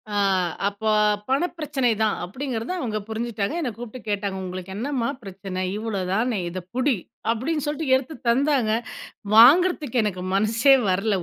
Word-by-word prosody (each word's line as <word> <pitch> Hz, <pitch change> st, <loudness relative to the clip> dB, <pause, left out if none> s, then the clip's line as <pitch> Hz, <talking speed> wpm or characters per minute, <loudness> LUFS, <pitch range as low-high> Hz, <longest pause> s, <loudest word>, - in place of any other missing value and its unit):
ஆ -, -, +1 dB, 0.5 s
அப்போ 210 Hz, +2 st, -2 dB, 0.4 s
பண 275 Hz, +7 st, +2 dB
பிரச்சனை 290 Hz, -5 st, 0 dB
தான் 215 Hz, -1 st, +2 dB
அப்படிங்கிறத 240 Hz, -, -4 dB
அவங்க 225 Hz, -8 st, -2 dB
புரிஞ்சுட்டாங்க. 220 Hz, 0 st, -2 dB
என்ன 255 Hz, -7 st, -2 dB
கூப்பிட்டு 240 Hz, 0 st, -9 dB
கேட்டாங்க 200 Hz, -1 st, -2 dB
"உங்களுக்கு 185 Hz, +1 st, -6 dB
என்னம்மா 250 Hz, 0 st, -1 dB
பிரச்சனை? 190 Hz, -1 st, -6 dB, 0.2 s
இவ்வளவுதானே 215 Hz, +1 st, -1 dB
இத 185 Hz, +2 st, -5 dB, 0.2 s
புடி." 255 Hz, +1 st, +2 dB, 0.4 s
அப்டின்னு 280 Hz, +6 st, -1 dB
சொல்லிட்டு 295 Hz, -2 st, 0 dB
எடுத்து 270 Hz, +4 st, -3 dB
தந்தாங்க. 265 Hz, -2 st, +2 dB, 0.6 s
வாங்குறதுக்கு 285 Hz, +1 st, +6 dB
எனக்கு 185 Hz, -3 st, -2 dB
மனசே 225 Hz, +7 st, +4 dB
வரல 195 Hz, +3 st, +1 dB
230 Hz, 135 wpm, -24 LUFS, 205-270 Hz, 0.6 s, வாங்குறதுக்கு